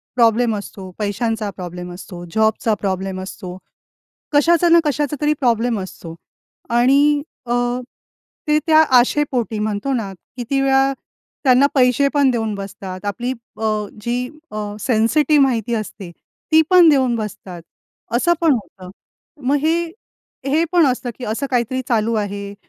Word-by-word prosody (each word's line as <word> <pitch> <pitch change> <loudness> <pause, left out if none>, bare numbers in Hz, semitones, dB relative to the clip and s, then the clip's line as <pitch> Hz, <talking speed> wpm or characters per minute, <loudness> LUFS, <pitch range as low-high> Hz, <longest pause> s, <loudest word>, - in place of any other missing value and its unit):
Problem 230 -1 +3
असतो, 195 -2 -8
पैशांचा 215 +1 -2
problem 180 -1 -7
असतो, 180 -1 -9
जॉबचा 220 0 +2
प्रॉब्लेम 190 -1 -2
असतो, 185 -1 -8 0.8
कशाचा 340 +3 +4
ना 335 0 +7
कशाचा 295 0 0
तरी 300 0 +3
प्रॉब्लेम 235 -3 +1
असतो. 170 -3 -9 0.6
आणि 280 +5 +4 0.2
अ, 240 - -2 0.9
ते 300 0 +3
त्या 315 0 +6 0.2
आशेपोटी 245 -5 0
म्हणतो 215 +5 -2
ना, 215 -6 -2 0.3
किती 260 +3 -1
वेळा 270 0 +3 0.5
त्यांना 260 +1 +5
पैसे 255 +1 +4
पण 280 -2 +3
देऊन 225 -3 -1
बसतात. 195 -1 -8
आपली 240 +5 -2 0.3
अ, 220 - -6 0.4
जी 235 +3 -2 0.4
अ, 210 -1 -5
सेन्सिटिव्ह 275 +6 +3
माहिती 235 -2 -1
असते 205 -4 -6 0.4
ती 315 - +7
पण 355 -3 +7
देऊन 260 -4 +3
बसतात, 195 -5 -6 0.5
असं 345 +8 +3
पण 325 -3 +4
होतं. 190 -6 -7 0.6
मग 280 - +3
हे, 330 +3 +2 0.6
हे 310 +4 +2
पण 345 -3 +5
असतं, 250 -1 -1
की - - -7
असं 225 +6 -2
काहीतरी 250 +1 0
चालू 230 0 +1
आहे, 200 -1 -3
235 Hz, 140 wpm, -19 LUFS, 205-275 Hz, 0.9 s, ना